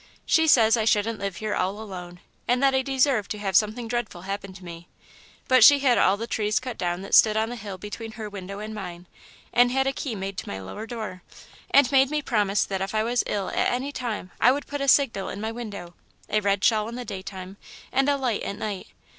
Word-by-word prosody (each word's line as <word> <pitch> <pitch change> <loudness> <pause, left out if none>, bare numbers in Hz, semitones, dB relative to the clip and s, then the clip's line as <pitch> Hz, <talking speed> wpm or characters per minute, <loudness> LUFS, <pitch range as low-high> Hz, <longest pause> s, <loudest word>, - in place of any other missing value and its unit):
She 320 0 +3
says 230 -5 +5
I 220 - +1
shouldn't 215 0 +1
live 200 -2 -3
here 215 +1 -3
all 190 +3 -1
alone, 180 -4 -8 0.3
and 250 +2 +2
that 270 -1 +4
I 265 - +3
deserve 260 -5 +1
to 210 - -4
have 195 -3 -3
something 220 +4 +2
dreadful 240 -7 -4
happen 195 0 -5
to 185 -1 -13
me, 170 0 -10 0.6
but 255 -2 +6
she 285 +3 +9
had 265 -3 +3
all 195 +2 +4
the 230 - -4
trees 215 -2 0
cut 255 -1 -6
down 175 0 -2
that 195 - -8
stood 215 -1 +6
on 220 +1 0
the 245 - -5
hill 200 -4 -7
between 220 +3 -7
her 215 -1 -6
window 200 -1 -7
and 215 +1 -6
mine, 180 -4 -7 0.5
and 245 0 +5
had 265 +1 +1
a 270 - 0
key 255 -4 -4
made 195 -1 -5
to - - -8
my 95 - -5
lower 95 - -7
door, 215 -6 -6 0.5
and 275 -2 +5
made 270 -1 +5
me 300 0 -1
promise 210 -5 +1
that 190 -1 -3
if 195 +3 -3
I 215 - +2
was 240 +1 +1
ill 200 -2 -2
at - - +1
any 260 +3 -2
time, 225 -9 -5
I 245 - +7
would 285 +2 -2
put 290 -1 -5
a 275 - -1
signal 260 -8 +3
in 200 - -6
my 220 +1 -3
window 205 -7 -7 0.4
a 215 - +2
red 200 -1 0
shawl 215 -2 +3
in 235 - -7
the 250 0 -6
daytime 190 -1 -7 0.3
and 270 +2 +2
a 285 - +2
light 250 -6 -1
at 200 - -4
night. 205 -3 -5
215 Hz, 240 wpm, -25 LUFS, 195-245 Hz, 0.6 s, she